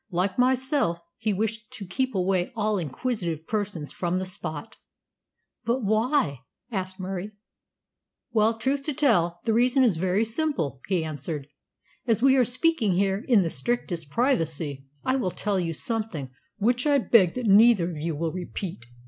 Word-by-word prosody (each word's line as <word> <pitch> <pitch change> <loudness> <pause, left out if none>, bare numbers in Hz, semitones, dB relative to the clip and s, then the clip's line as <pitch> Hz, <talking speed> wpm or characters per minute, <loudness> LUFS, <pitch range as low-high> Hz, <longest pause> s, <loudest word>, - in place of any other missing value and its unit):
"Like 185 +3 -1
myself, 260 - +2 0.2
he 220 -1 0
wished 215 +2 -2
to 200 - -6
keep 260 +6 -2
away 185 +2 +1
all 215 -2 0
inquisitive 170 - -3
persons 200 -8 -3
from 175 0 -1
the 185 - -2
spot." 160 -5 -6 0.9
"But 240 +2 0
why?" 215 - +1 0.3
asked 185 -2 -3
Murie. 190 +2 -4 1.0
"Well, 220 0 +3
truth 270 +5 0
to 300 - -2
tell, 175 - +2
the 225 - +1
reason 250 +3 +4
is 215 -10 +3
very 190 +5 +1
simple," 225 - -2
he 180 -5 0
answered. 150 -1 -5 0.6
"As 230 0 +2
we 270 0 +6
are 260 - +5
speaking 255 - +1
here 195 +3 +1
in 230 -6 +5
the 165 -3 -1
strictest 170 - -2
privacy, 160 - -1 0.2
I 260 +1 +2
will 200 -8 0
tell 200 +1 -1
you 170 -2 -1
something 170 - -3 0.3
which 245 +6 +1
I 290 -1 +5
beg 225 -8 +4
that 250 -1 -3
neither 205 -3 +6
of 160 - -7
you 160 +1 -2
will 160 +2 -2
repeat. 175 - -6
200 Hz, 160 wpm, -26 LUFS, 170-240 Hz, 1.0 s, we